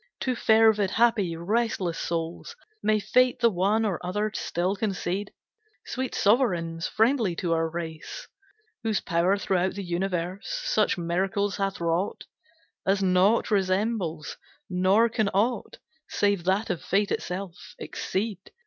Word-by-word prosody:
To 255 - 0
fervid, 220 -3 +4
happy, 220 -6 +2
restless 190 -1 -1
souls 170 - -4 0.3
May 215 0 +2
fate 255 +4 +2
the 235 -1 +4
one 205 +4 +1
or 190 -6 -2
other 205 +4 -1
still 180 +1 -1
concede, 195 -1 -2 0.5
Sweet 260 0 -3
sovereigns, 175 -8 +1
friendly 225 -5 +2
to 170 0 -1
our 165 0 +1
race, 165 - -6 0.5
Whose 220 -3 0
power, 175 +4 +1
throughout 190 -1 0
the 200 - -4
universe, 180 +1 -2 0.2
Such - - +2
miracles 190 +4 -1
hath 195 -1 -2
wrought, 170 +3 -1 0.6
As 195 +1 +1
naught 190 +5 +3
resembles, 190 -4 0 0.3
nor 190 +5 +4
can 220 -3 0
aught, 225 +3 0 0.3
Save 200 -4 +1
that 190 +4 +1
of 175 - -3
Fate 200 +2 0
itself, 180 -1 -5
exceed. 200 -1 -3
195 Hz, 130 wpm, -26 LUFS, 175-220 Hz, 0.6 s, fervid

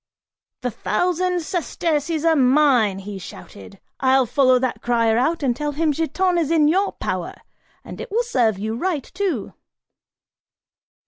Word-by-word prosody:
"The 250 - -2
thousand 360 - -1
sesterces 325 -2 -2
are 325 -1 +4
mine," 255 -7 +3
he 195 0 -7
shouted, 100 - -12 0.2
"I'll 265 0 +3
follow 255 +1 +3
that 255 0 -2
crier 230 -2 +2
out 305 +7 0
and 250 -3 +1
tell 295 +2 -3
him 310 +1 +1
Giton 345 +4 0
is 315 -4 -1
in 320 -3 +3
your 385 +6 +1
power, - - -4 0.5
and - - -8
it 480 - -7
will 460 +4 0
serve 235 - +1
you 220 +3 -3
right, 315 +1 -2
too!" 365 - -3
290 Hz, 145 wpm, -21 LUFS, 240-340 Hz, 0.5 s, are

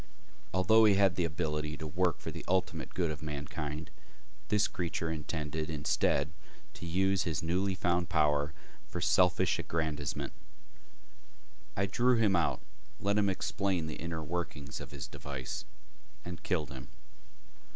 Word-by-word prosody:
Although 110 +5 +6
he 105 -2 +6
had 95 -2 +4
the 90 - +2
ability 75 -2 -1
to 80 - -5
work 85 +2 +1
for - - -5
the - - -7
ultimate 90 -3 0
good 85 -4 +1
of 75 - -6
mankind, 75 +1 -4 0.6
this 105 0 +3
creature 85 -2 -2
intended, 80 0 -3
instead, 75 -1 +1 0.4
to 85 - -7
use 95 +2 +2
his 80 -4 -1
newly 95 +3 +1
found 90 0 +1
power 75 -3 +3 0.4
for - - -4
selfish - - +4
aggrandizement. 80 -4 -2 1.4
I 100 - +3
drew 120 +6 +3
him 105 -4 +4
out, 85 -2 +2 0.4
let 100 +1 +1
him 100 -1 +3
explain 95 -2 0
the 80 - -5
inner 85 -2 -3
workings 75 -4 -4
of - - -7
his 70 -2 -6
device 70 -2 -5 0.6
and 90 0 -6
killed 80 -7 -1
him. 65 -1 -8
85 Hz, 140 wpm, -32 LUFS, 75-95 Hz, 1.4 s, Although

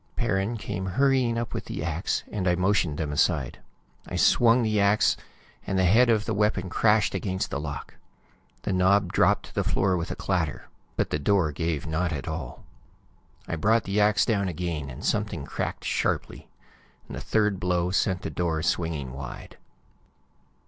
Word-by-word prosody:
Perrin 100 +5 0
came 95 -2 -4
hurrying 130 +2 +2
up 115 0 -3
with - - -4
the 75 - -5
ax, 85 +2 -1
and 95 -3 -2
I 90 - +3
motioned 90 -4 +1
them 75 -2 -2
aside. 75 -3 0 0.5
I - - -5
swung 120 +1 +4
the 110 -2 +1
ax, 100 +2 +3 0.5
and 95 - 0
the 95 - +3
head 115 +7 +5
of 110 -2 +2
the 110 - -1
weapon 100 -3 0
crashed 105 -1 +3
against 95 -2 -2
the 70 - -2
lock. 75 -2 -6 0.7
The 100 - -1
knob 95 0 +3
dropped - - +3
to - - -15
the - - 0
floor 95 -1 +1
with 85 0 -3
a - - -3
clatter, 90 -7 -2 0.3
but - - -1
the 75 - 0
door 90 0 +2
gave 80 -1 -2
not 80 +2 -1
at 75 -1 -4
all. 80 -6 -6 0.8
I - - -2
brought 110 +8 +2
the 100 +1 -1
ax 105 0 +4
down 100 -4 +1
again, 85 -5 -3
and - - -8
something - - -1
cracked - - -4
sharply. - - -2 0.6
The - - -6
third 105 -3 +1
blow 90 -1 0
sent 95 -1 0
the - - -4
door 80 -3 -1
swinging 80 -7 -1
wide. 65 -2 -8
90 Hz, 175 wpm, -26 LUFS, 80-105 Hz, 0.8 s, head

